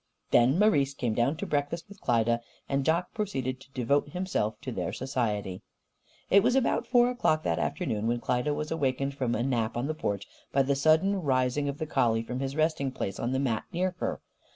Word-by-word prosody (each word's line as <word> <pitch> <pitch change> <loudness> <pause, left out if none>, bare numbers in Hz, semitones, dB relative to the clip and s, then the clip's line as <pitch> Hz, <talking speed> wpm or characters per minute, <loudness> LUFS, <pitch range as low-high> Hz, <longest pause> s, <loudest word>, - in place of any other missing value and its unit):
Then 125 +6 +5
Marise 145 -10 +3
came 120 -5 -1
down 120 +7 +1
to - - -4
breakfast 145 +5 -2
with 200 -1 -14
Klyda, 115 0 +2 0.3
and 140 0 0
Jock 170 +5 +1
proceeded 135 - -2
to 135 +1 -17
devote 140 +3 +1
himself 180 - -2
to - - -5
their - - -2
society. 110 -8 -2 0.7
It 200 - +7
was 250 - +2
about 265 -2 +1
four 245 -1 +4
o'clock 155 -10 +1
that 85 - 0
afternoon 110 0 -1
when 120 +1 +1
Klyda 125 +5 0
was 150 +1 -4
awakened 140 -3 0
from 130 -3 -1
a 120 - 0
nap 120 -3 0
on 120 - -1
the 155 - -1
porch 100 -10 -3 0.2
by 135 - +3
the 140 +1 +1
sudden 160 +7 +3
rising 130 0 +1
of 140 - -4
the 155 - -3
collie 115 -6 +1
from 125 +2 -4
his 135 0 -3
resting 155 -3 +1
place 100 -6 -4
on 120 - -1
the 130 - +1
mat 125 -5 0
near 180 +1 0
her. - - -2
135 Hz, 205 wpm, -28 LUFS, 120-155 Hz, 0.7 s, It